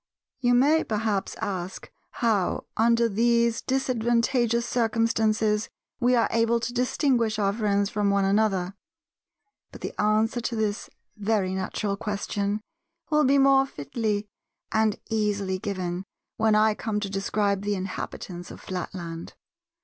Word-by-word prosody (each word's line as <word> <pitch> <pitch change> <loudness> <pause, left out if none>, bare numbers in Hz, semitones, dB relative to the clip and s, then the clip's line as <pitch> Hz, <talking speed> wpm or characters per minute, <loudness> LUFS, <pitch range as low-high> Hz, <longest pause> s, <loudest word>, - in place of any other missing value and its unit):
You 245 -1 +3
may 295 +6 +4
perhaps 210 -2 -1
ask 185 -1 -4 0.3
how 205 -5 +1
under 230 +1 +3
these 235 +2 +2
disadvantagous 240 -2 +1
circumstances 220 -2 +1 0.3
we 250 0 +3
are 230 - +3
able 230 +1 +2
to 240 +1 -4
distinguish 245 -3 +1
our 200 -2 +1
friends 205 -2 +1
from 205 -1 +1
one 200 -1 +2
another: 195 -2 +1 1.0
but - - -12
the - - -4
answer 220 +3 +2
to 235 - -2
this 215 -1 -2 0.3
very 205 -3 0
natural 200 +2 -2
question 205 0 -2 0.5
will 300 -1 +4
be 275 +2 +4
more 270 0 +5
fitly 210 - -2 0.5
and 220 -1 +2
easily 205 -3 0
given 185 -3 -3 0.3
when 220 -1 +3
I 215 0 +4
come 210 0 -2
to 205 - -2
describe 200 0 0
the 205 0 -1
inhabitants 185 -1 -6
of - - -10
Flatland. 170 -2 -6
215 Hz, 130 wpm, -26 LUFS, 200-235 Hz, 1.0 s, more